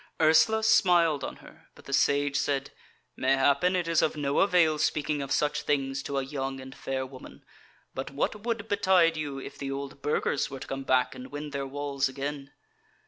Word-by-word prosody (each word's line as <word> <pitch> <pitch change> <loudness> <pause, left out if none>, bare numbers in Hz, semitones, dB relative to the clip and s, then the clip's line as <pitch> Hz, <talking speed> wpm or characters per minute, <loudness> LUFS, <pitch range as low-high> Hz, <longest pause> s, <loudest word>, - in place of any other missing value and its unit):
Ursula 160 +8 +4
smiled 175 -9 +4
on - - -5
her, - - -17
but - - -17
the 140 - -6
Sage 140 +1 +2
said: 140 -1 -1 0.4
"Mayhappen 140 +7 +2
it 175 -2 -1
is 165 -1 +3
of 155 - 0
no 140 -1 0
avail 170 -5 +3
speaking 150 -1 0
of 135 - -6
such 150 -1 +1
things 135 -1 -1
to 140 0 -4
a 135 - 0
young 135 -1 -4
and 130 0 -10
fair 130 0 -3
woman; 130 0 -13 0.5
but 130 - -5
what 145 +9 -2
would 230 -2 -2
betide 185 -5 +3
you 145 -3 -4
if 135 - -9
the 140 - -4
old 140 0 -6
Burgers 145 0 0
were 135 - -7
to - - -9
come 135 0 -4
back 130 -1 +2
and 125 - -9
win 145 0 -6
their 140 -1 -3
walls 140 -1 -2
again?" 140 +1 -5
140 Hz, 195 wpm, -28 LUFS, 135-160 Hz, 0.5 s, Ursula